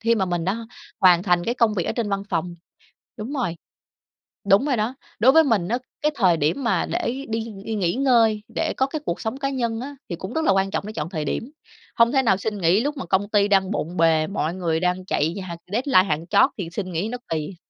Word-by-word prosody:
khi 230 +1 +2
mà 195 -4 +1
mình 175 -2 -2
đã 220 +5 -2 0.3
hoàn 180 -2 +6
thành 175 -2 +2
cái 235 - -1
công 230 -4 +2
việc 175 - -1
ở - - 0
trên 230 -4 -2
văn 195 0 -1
phòng. 175 0 -2 0.6
Đúng 225 +7 -5
rồi, 240 - -2 0.9
đúng 200 +7 +5
rồi 275 -4 +1
đó, 220 +3 -1 0.2
đối 250 +5 +6
với 320 +2 +6
mình 215 - +1
á, 240 +4 0 0.2
cái 300 +1 +2
thời 185 -9 +3
điểm 160 - 0
mà 230 - +1
để 270 +4 -3
đi 225 0 -2 0.2
đi 225 - -3
nghỉ 180 -5 0
ngơi, 230 -5 +3
để - - -1
có 265 - +2
cái 300 +3 -5
cuộc 170 - -2
sống 220 +3 -3
cá 275 0 -1
nhân 235 -4 -2
á 280 +3 -7
thì 170 - -3
cũng 190 +5 -7
rất 320 - 0
là - - +4
quan 195 0 +1
trọng 195 - -3
để 215 - -6
chọn 155 -7 -4
thời 155 -5 -3
điểm. 230 - -3 0.5
Hông 230 +1 +4
thể 270 -2 +3
nào 220 -7 +3
xin 210 +2 -3
nghỉ 180 +3 +3
lúc 290 +4 -2
mà 185 - -5
công 190 +4 +1
ty 205 -1 +3
đang 195 -2 +3
bộn 175 -3 -3
bề, 160 -2 +3
mọi 170 -4 -2
người 165 -3 -1
đang 180 +1 0
chạy 160 -2 0
như 195 - -5
h 185 - -7 0.2
deadline 245 -3 +4
hạng 155 +2 -1
chót 260 - +4
thì 180 -4 -4
xin 185 -1 -4
nghỉ 175 +6 -1
nó 245 +2 -4
kỳ. 160 +3 -3
205 Hz, 255 wpm, -23 LUFS, 175-235 Hz, 0.9 s, hoàn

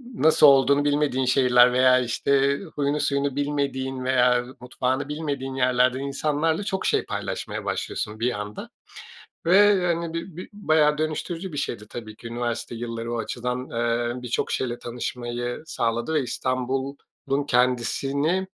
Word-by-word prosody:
nasıl 160 -5 +6
olduğunu 140 +1 +5
bilmediğin 145 -3 +1
şehirler 125 -1 +5
veya, 130 0 +5
işte, 140 +3 +1 0.2
huyunu 145 +1 0
suyunu 140 -1 0
bilmediğin 140 -2 -2
veya 125 -1 +3
mutfağını 130 +2 -2
bilmediğin 140 -3 -4
yerlerden 125 0 +2
insanlarla 150 +5 -1
çok 195 -2 -3
şey - - +1
paylaşmaya - - -4
başlıyorsun 105 +1 -3
bir 120 +2 +1
anda 105 0 -7 0.8
ve, 195 +1 +5
hani, 170 -1 -1
bi 165 0 -5
bi 180 - -7
bayağı 155 -7 +2
dönüştürücü 165 +3 -3
bir - - -6
şeydi 105 -5 -4
tabii 110 -2 -8
ki 115 - -11
üniversite 120 0 -3
yilları 115 0 -5
o - - -2
açıdan. 125 +2 -4
Eee, 120 +1 -1
birçok 125 -1 -2
şeyle 120 -2 -2
tanışmayı 120 +1 -4
sağladı 120 +2 -1
ve 150 - +2
İstanbul'un 135 +2 -3
kendisini 135 +8 +1
130 Hz, 135 wpm, -24 LUFS, 120-150 Hz, 0.8 s, nasıl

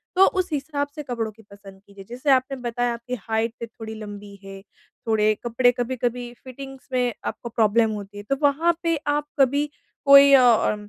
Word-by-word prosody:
तो 380 +1 +7
उस 370 - -1
हिसाब 285 0 -2
से 300 - -6
कपड़ों 235 -5 -4
की 220 +1 -19
पसंद 195 -1 -14
कीजिए। 200 -1 -13
जैसे 255 +4 -4
आपने 265 +1 +2
बताया 245 0 -2
आपकी 235 +2 -6
हाइट 225 +2 -2
थोड़ी 220 0 -9
लम्बी 205 -1 -9
है, 195 0 -10 0.5
थोड़े 215 -1 +3
कपड़े 245 +1 +3
कभी-कभी 245 0 -3
फिटिंग्स 270 +1 -10
में 250 -2 +1
आपको 235 - -5
प्रॉब्लम 225 0 +2
होती 205 -1 -7
है, 205 - -7
तो 275 +6 -1
वहाँ 315 +4 +2
पे 330 -1 +1
आप 295 0 0
कभी 285 +2 +2 0.4
कोई 280 0 +8
अ, 245 -5 +5
245 Hz, 175 wpm, -23 LUFS, 220-275 Hz, 0.5 s, कोई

